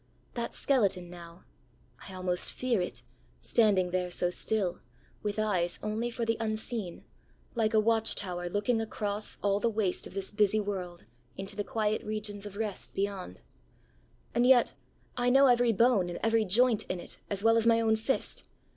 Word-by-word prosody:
That 235 Hz, -1 st, -4 dB
skeleton, 195 Hz, -10 st, +1 dB
nowãI 170 Hz, 0 st, -12 dB, 0.7 s
almost 180 Hz, -1 st, -1 dB
fear 245 Hz, -6 st, 0 dB
it, 180 Hz, -, -5 dB, 0.4 s
standing 200 Hz, -6 st, +2 dB
there 180 Hz, 0 st, -1 dB
so 175 Hz, 0 st, 0 dB
still, 190 Hz, -2 st, -1 dB, 0.4 s
with 210 Hz, 0 st, -3 dB
eyes 185 Hz, -5 st, 0 dB
only 220 Hz, +3 st, -1 dB
for 235 Hz, 0 st, -3 dB
the 225 Hz, 0 st, 0 dB
unseen, 215 Hz, -3 st, -3 dB, 0.5 s
like 220 Hz, -2 st, +1 dB
a -, -, +6 dB
watch 225 Hz, 0 st, +2 dB
tower 175 Hz, -2 st, -4 dB
looking 210 Hz, +4 st, 0 dB
across 210 Hz, -1 st, -2 dB
all 200 Hz, 0 st, +2 dB
the 235 Hz, -, +1 dB
waste 210 Hz, -4 st, -1 dB
of -, -, -14 dB
this 195 Hz, -1 st, -3 dB
busy 210 Hz, 0 st, +2 dB
world 185 Hz, -4 st, -5 dB, 0.3 s
into 195 Hz, +1 st, -3 dB
the 205 Hz, -, -2 dB
quiet 215 Hz, 0 st, -1 dB
regions 210 Hz, -1 st, -4 dB
of 200 Hz, 0 st, -10 dB
rest 210 Hz, -3 st, -4 dB
beyond. 195 Hz, -1 st, -3 dB, 0.9 s
And 240 Hz, +1 st, +3 dB
yet 255 Hz, -2 st, +5 dB, 0.4 s
I 245 Hz, 0 st, +2 dB
know 270 Hz, +2 st, +6 dB
every 245 Hz, -2 st, +4 dB
bone 220 Hz, -4 st, +3 dB
and 175 Hz, -, -5 dB
every 225 Hz, 0 st, +3 dB
joint 225 Hz, +3 st, +3 dB
in 185 Hz, -, -3 dB
it -, -, -8 dB
as 200 Hz, 0 st, -2 dB
well 225 Hz, 0 st, +5 dB
as 230 Hz, 0 st, +2 dB
my 230 Hz, 0 st, +5 dB
own 220 Hz, -1 st, +3 dB
fist. 225 Hz, +5 st, -2 dB
210 Hz, 170 wpm, -30 LUFS, 190-225 Hz, 0.9 s, a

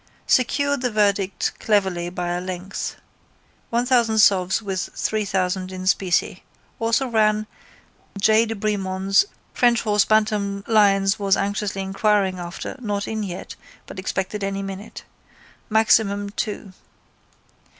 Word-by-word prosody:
Secured 285 Hz, +2 st, +2 dB
the 250 Hz, -, 0 dB
verdict 200 Hz, -3 st, +1 dB
cleverly 190 Hz, -5 st, +1 dB
by 175 Hz, 0 st, -4 dB
a 175 Hz, 0 st, -2 dB
length. 185 Hz, +1 st, -5 dB, 0.7 s
1000 235 Hz, -1 st, +2 dB
sovs 190 Hz, -3 st, +4 dB
with 195 Hz, -4 st, -3 dB
3000 190 Hz, -3 st, -1 dB
in 185 Hz, 0 st, -6 dB
specie. 185 Hz, -1 st, +1 dB, 0.4 s
Also 230 Hz, +4 st, +1 dB
ran: 215 Hz, -2 st, +2 dB, 0.7 s
J 220 Hz, +3 st, +4 dB
de 225 Hz, -, -3 dB
Bremond's 195 Hz, -, +1 dB, 0.3 s
(French 240 Hz, -1 st, +3 dB
horse 210 Hz, -2 st, +3 dB
Bantam 210 Hz, -2 st, +1 dB
Lyons 200 Hz, -2 st, +3 dB
was 195 Hz, -1 st, +2 dB
anxiously 200 Hz, 0 st, -2 dB
inquiring 195 Hz, -1 st, +1 dB
after 175 Hz, +1 st, -6 dB
not 205 Hz, -4 st, -3 dB
in 220 Hz, -1 st, -3 dB
yet 185 Hz, -4 st, -6 dB, 0.3 s
but -, -, -9 dB
expected 190 Hz, +2 st, -3 dB
any 195 Hz, 0 st, -2 dB
minute) 195 Hz, +2 st, -8 dB, 0.7 s
Maximum 215 Hz, -2 st, +2 dB, 0.2 s
II. 205 Hz, -1 st, -7 dB
200 Hz, 120 wpm, -22 LUFS, 190-220 Hz, 0.7 s, sovs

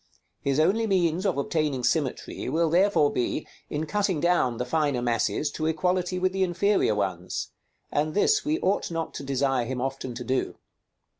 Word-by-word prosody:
His 140 Hz, +1 st, 0 dB
only 205 Hz, +8 st, +3 dB
means 180 Hz, -1 st, +1 dB
of 180 Hz, -, 0 dB
obtaining 140 Hz, -2 st, -1 dB
symmetry 130 Hz, +2 st, -1 dB
will 165 Hz, 0 st, +1 dB
therefore 175 Hz, -4 st, +4 dB
be, 125 Hz, +5 st, -1 dB, 0.2 s
in 150 Hz, +2 st, -2 dB
cutting 195 Hz, 0 st, 0 dB
down 160 Hz, -8 st, +2 dB
the 125 Hz, -, -2 dB
finer 145 Hz, -1 st, +1 dB
masses 120 Hz, +5 st, 0 dB
to 155 Hz, +1 st, -2 dB
equality 180 Hz, +3 st, 0 dB
with 185 Hz, 0 st, +1 dB
the 190 Hz, -, -1 dB
inferior 185 Hz, -, +2 dB
ones; 90 Hz, -3 st, -3 dB, 0.4 s
and 155 Hz, +1 st, 0 dB
this 420 Hz, -, +3 dB
we 310 Hz, +2 st, 0 dB
ought 195 Hz, +2 st, +1 dB
not 165 Hz, -1 st, -3 dB
to -, -, -6 dB
desire 135 Hz, -2 st, 0 dB
him 130 Hz, +1 st, -3 dB
often 130 Hz, -1 st, -3 dB
to 125 Hz, -, -5 dB
do. 130 Hz, +2 st, -1 dB
155 Hz, 170 wpm, -26 LUFS, 130-180 Hz, 0.4 s, therefore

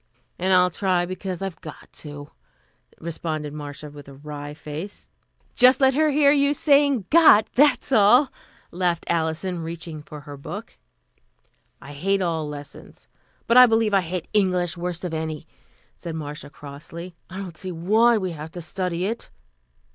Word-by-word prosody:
"And 185 Hz, +2 st, 0 dB
I'll 180 Hz, -1 st, +5 dB
try 180 Hz, -1 st, +1 dB
because 185 Hz, 0 st, -5 dB
I've 190 Hz, -4 st, -6 dB
got 155 Hz, -, -10 dB
to," 145 Hz, -1 st, -9 dB, 0.7 s
responded 155 Hz, -2 st, -4 dB
Marcia 145 Hz, 0 st, -8 dB
with 145 Hz, -1 st, -12 dB
a 140 Hz, -, -12 dB
wry 145 Hz, +1 st, -8 dB
face. 155 Hz, +6 st, -8 dB, 0.4 s
"Just 250 Hz, +1 st, +6 dB
let 265 Hz, -1 st, +4 dB
her 310 Hz, +3 st, +3 dB
hear 285 Hz, -1 st, +4 dB
you 285 Hz, 0 st, +3 dB
saying 280 Hz, -, +3 dB
got, 300 Hz, -10 st, +7 dB
that's 275 Hz, -1 st, +3 dB
all," 245 Hz, +4 st, +5 dB, 0.4 s
laughed 175 Hz, -1 st, -1 dB
Alison, 170 Hz, +2 st, -1 dB
reaching 165 Hz, -1 st, -7 dB
for 150 Hz, 0 st, -10 dB
her 145 Hz, 0 st, -10 dB
book. 140 Hz, -, -8 dB, 1.0 s
"I 145 Hz, -, -11 dB
hate 195 Hz, +7 st, 0 dB
all 160 Hz, -3 st, -2 dB
lessons, 145 Hz, -1 st, -11 dB, 0.4 s
but 235 Hz, -, +3 dB
I 250 Hz, 0 st, +10 dB
believe 225 Hz, -2 st, +2 dB
I 195 Hz, -, +5 dB
hate 180 Hz, 0 st, -5 dB
English 180 Hz, -3 st, +1 dB
worst 175 Hz, 0 st, -4 dB
of 170 Hz, -, -4 dB
any," 160 Hz, -1 st, -4 dB, 0.5 s
said 165 Hz, -2 st, -6 dB
Marcia 150 Hz, -2 st, -7 dB
crossly. 155 Hz, +5 st, -10 dB, 0.2 s
"I 185 Hz, -, -8 dB
don't 190 Hz, -4 st, -7 dB
see 185 Hz, +1 st, -6 dB
why 215 Hz, +8 st, +3 dB
we 185 Hz, -3 st, -2 dB
have 155 Hz, -1 st, -7 dB
to 180 Hz, -, -6 dB
study 180 Hz, +1 st, -2 dB
it." 225 Hz, +4 st, -4 dB
175 Hz, 160 wpm, -23 LUFS, 155-210 Hz, 1.0 s, I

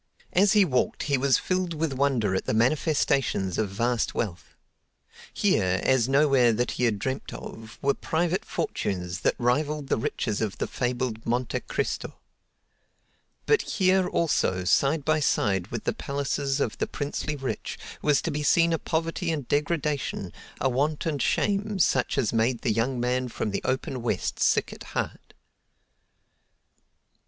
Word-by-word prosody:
As 195 Hz, +2 st, +5 dB
he 205 Hz, -2 st, +6 dB
walked 130 Hz, -7 st, 0 dB
he 140 Hz, -2 st, +1 dB
was 135 Hz, -2 st, +4 dB
filled 185 Hz, -2 st, -1 dB
with 155 Hz, -2 st, -1 dB
wonder 130 Hz, -7 st, +1 dB
at 95 Hz, -, -1 dB
the -, -, 0 dB
manifestations 130 Hz, -, +1 dB
of 110 Hz, -3 st, 0 dB
vast 115 Hz, +4 st, 0 dB
wealth. 100 Hz, -7 st, -4 dB, 0.8 s
Here, 95 Hz, 0 st, +2 dB
as 130 Hz, -2 st, +3 dB
nowhere 135 Hz, -4 st, +4 dB
that 120 Hz, +3 st, 0 dB
he 125 Hz, -, 0 dB
had 110 Hz, -3 st, +1 dB
dreamed 130 Hz, +6 st, -3 dB
of, 110 Hz, 0 st, -9 dB
were 140 Hz, 0 st, +3 dB
private 170 Hz, +5 st, -1 dB
fortunes 90 Hz, -1 st, -3 dB
that -, -, +1 dB
rivaled 145 Hz, +4 st, 0 dB
the -, -, +2 dB
riches 115 Hz, -4 st, -2 dB
of 105 Hz, -3 st, -2 dB
the -, -, -1 dB
fabled 125 Hz, -2 st, -2 dB
Monte 120 Hz, +2 st, 0 dB
Cristo. -, -, -3 dB, 1.3 s
But 440 Hz, -, +4 dB
here, 185 Hz, -2 st, +2 dB
also, 95 Hz, -, +1 dB
side 140 Hz, -, +2 dB
by 155 Hz, 0 st, +3 dB
side 95 Hz, -10 st, +1 dB
with 115 Hz, 0 st, -5 dB
the -, -, 0 dB
palaces 140 Hz, 0 st, -2 dB
of 115 Hz, -, -1 dB
the -, -, 0 dB
princely 145 Hz, +1 st, -3 dB
rich, 130 Hz, -6 st, -4 dB, 0.2 s
was 150 Hz, -2 st, +2 dB
to 170 Hz, -, -1 dB
be 150 Hz, +1 st, -2 dB
seen 165 Hz, +3 st, +4 dB
a 165 Hz, -, 0 dB
poverty 165 Hz, +2 st, -2 dB
and 145 Hz, -6 st, -3 dB
degradation, 145 Hz, -, -1 dB, 0.3 s
a 135 Hz, -, +2 dB
want 145 Hz, +4 st, 0 dB
and 150 Hz, -4 st, -1 dB
shame, 205 Hz, 0 st, +1 dB
such 135 Hz, -7 st, +2 dB
as 110 Hz, -, +1 dB
made 115 Hz, +2 st, +1 dB
the 115 Hz, -, +1 dB
young 120 Hz, +4 st, 0 dB
man 125 Hz, +1 st, 0 dB
from 110 Hz, -3 st, -3 dB
the 100 Hz, -, -2 dB
open 130 Hz, 0 st, -2 dB
West 120 Hz, -, -2 dB
sick -, -, +2 dB
at -, -, -13 dB, 0.2 s
heart. -, -, -4 dB
135 Hz, 160 wpm, -26 LUFS, 115-150 Hz, 1.3 s, he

